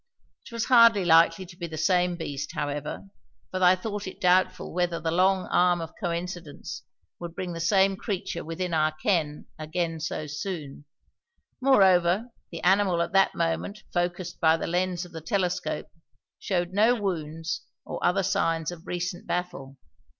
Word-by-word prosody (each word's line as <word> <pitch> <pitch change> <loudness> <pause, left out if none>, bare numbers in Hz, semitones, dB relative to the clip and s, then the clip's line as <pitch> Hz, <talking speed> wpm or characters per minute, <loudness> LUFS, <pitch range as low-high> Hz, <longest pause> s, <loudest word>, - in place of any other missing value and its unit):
It - - -12
was 230 0 -2
hardly 230 -6 +6
likely 165 +2 +5
to 175 0 -13
be 170 -1 -5
the 160 -1 -7
same 180 +2 +2
beast, 145 -2 -5
however, 145 +3 -4 0.5
for 185 - -3
I 180 0 +6
thought 205 +1 -5
it 190 - -8
doubtful 180 +1 +2
whether 175 -1 0
the 160 +1 -2
long 185 +2 +3
arm 175 -1 +3
of 165 -1 -6
coincidence 175 -4 -5 0.4
would 170 -1 -7
bring 180 -2 -4
the 165 - -6
same 195 +3 +3
creature 190 -5 -4
within 170 +2 -4
our 155 -1 +2
ken 155 -2 -1
again 165 +1 -2
so 155 0 -3
soon; 150 -2 -6 0.8
moreover 195 -3 +4 0.2
the 165 - -7
animal 190 -1 +3
at - - -6
that 195 0 +4
moment 170 +5 -2
focused 175 0 -2
by 160 -1 +4
the - - -4
lenses 180 +1 -1
of 175 - -14
the 165 -2 -7
telescope 180 +2 -2 0.5
showed 180 -2 -1
no 220 +5 +4
wounds 165 -5 -3 0.2
or - - -6
other 195 +2 +2
signs 165 -3 0
of 175 -1 -11
recent 175 0 -4
battle. 175 -7 -4
175 Hz, 160 wpm, -26 LUFS, 165-190 Hz, 0.8 s, hardly